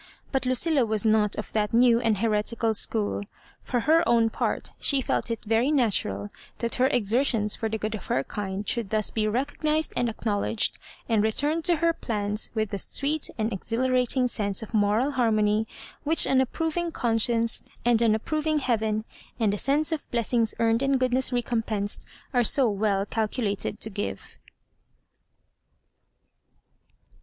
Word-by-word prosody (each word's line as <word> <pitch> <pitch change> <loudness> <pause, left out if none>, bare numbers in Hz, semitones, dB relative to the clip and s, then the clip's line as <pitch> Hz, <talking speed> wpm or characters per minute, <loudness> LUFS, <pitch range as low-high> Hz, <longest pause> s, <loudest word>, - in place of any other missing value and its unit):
But 265 -2 -1
Lucilla 270 +2 +3
was 220 -1 0
not 215 -1 +2
of 215 - -6
that 210 0 -1
new 235 -1 +5
and 225 -3 +1
heretical 225 +1 0
school. 210 -1 0 0.4
For 245 -2 -2
her 320 +6 +4
own 230 -1 +3
part, - - -2
she 280 - +4
felt 255 - -1
it 230 - -4
very 225 +5 +2
natural 190 - 0 0.3
that 235 -1 -3
her 260 - +5
exertions 230 -2 +1
for 225 - -3
the 220 - -2
good 215 0 -4
of 215 - -7
her 130 - 0
kind 195 +3 -5
should 230 -5 -1
thus 215 0 +1
be 215 -1 0
recognised 295 +6 -1
and 240 - 0
acknowledged, 215 0 -1 0.3
and 225 -3 +2
returned 290 +9 +1
to 350 - +5
her 335 +1 +1
plans 210 -6 -2
with 215 -2 -1
that 200 - -3
sweet 290 +2 -1
and 220 0 -1
exhilarating 250 +4 +1
sense 205 -4 0
of 220 - -11
moral 215 +6 +2
har 245 -4 +1
mony 215 0 +1 0.4
which 315 +2 +5
an 260 -1 +3
approving 325 +5 -2
conscience, 230 -2 +1 0.2
and 235 -1 +3
an 225 -2 +3
approving 310 +7 -1
heaven, 220 -5 -1 0.3
and 215 -3 +2
a - - -2
sense 295 +4 +2
of 315 -2 -4
blessings 230 -1 +1
earned 230 +1 +2
and 275 -1 +1
goodness 255 0 0
recompensed, 225 -4 -2 0.3
are 245 -1 +3
so 260 +3 +4
well 200 -1 0
calculated 210 -2 -2
to 220 - -3
give. 205 +1 -6
230 Hz, 160 wpm, -26 LUFS, 215-260 Hz, 0.4 s, new